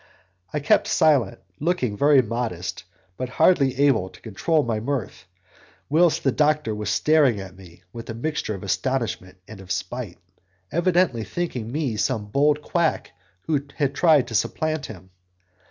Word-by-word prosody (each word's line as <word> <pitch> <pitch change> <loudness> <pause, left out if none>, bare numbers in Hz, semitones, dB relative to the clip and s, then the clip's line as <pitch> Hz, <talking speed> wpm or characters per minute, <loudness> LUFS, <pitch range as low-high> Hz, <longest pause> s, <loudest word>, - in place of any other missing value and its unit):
I - - -1
kept 140 - +2
silent, 140 -10 +2 0.2
looking 145 -9 0
very 140 +2 +5
modest, 110 -7 -4 0.3
but 130 -1 -4
hardly 135 -2 +3
able 135 -10 +3
to - - -17
control 115 - 0
my 115 -2 -1
mirth, 115 -6 -4 0.6
whilst 165 +3 +3
the 135 - +3
doctor 150 -4 +1
was 105 -1 -4
staring 140 -1 +3
at 95 -1 -9
me 90 -2 -16
with 115 -1 -9
a 110 - -4
mixture 125 -3 -3
of 95 - -9
astonishment 110 -4 -2
and 110 -3 -11
of 95 0 -10
spite, 100 +2 -4 0.5
evidently 175 -8 +2
thinking 120 - -4
me 140 -6 -2
some 110 0 -1
bold 145 +4 +2
quack 170 -1 0 0.3
who 150 +3 0
had 140 -3 0
tried 155 -3 +4
to - - -7
supplant 155 +7 -1
him. 95 -3 -12
125 Hz, 155 wpm, -23 LUFS, 105-150 Hz, 0.6 s, very